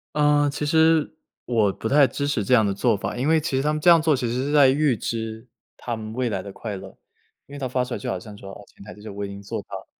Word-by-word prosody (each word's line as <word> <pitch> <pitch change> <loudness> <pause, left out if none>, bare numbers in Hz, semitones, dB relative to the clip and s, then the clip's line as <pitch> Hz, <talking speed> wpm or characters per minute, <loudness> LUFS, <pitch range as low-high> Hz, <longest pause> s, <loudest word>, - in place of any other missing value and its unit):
呃， 145 -1 +3
其 145 - -4
实， 160 +1 +3 0.3
我 110 -5 +1
不 110 - -5
太 140 +1 +5
支 140 - -3
持 145 -7 0
这 125 - +3
样 110 -3 +5
的 100 - 0
做 110 +3 +1
法。 100 - -5
因 130 +4 -1
为 160 0 +4
其 150 -4 -2
实 135 - +1
他 150 - +1
们 155 - -3
这 175 - +5
样 170 -1 +7
做， 155 -2 +2
其 125 - -2
实 115 - -2
是 145 - -2
在 145 -3 +6
预 140 -2 +2
支 115 +1 -5 0.3
他 120 -2 -5
们 110 0 -7
未 125 0 -1
来 95 -3 -3
的 100 - -9
快 105 0 -6
乐。 95 0 -11 0.5
因 140 - -12
为 - - -7
他 135 - -3
发 125 0 -1
出 125 -1 -4
来 - - -4
就 - - -4
好 95 - -2
像 105 +2 -11
说： 100 -1 -11
“哦， - - -11
前 - - -14
台 105 - -10
这 105 - -16
些 110 - -9
我 100 0 -5
已 - - -5
经 100 0 -9
做 100 - -5
到 - - -8
了， - - -10
125 Hz, 335 characters per minute, -23 LUFS, 105-145 Hz, 0.5 s, 样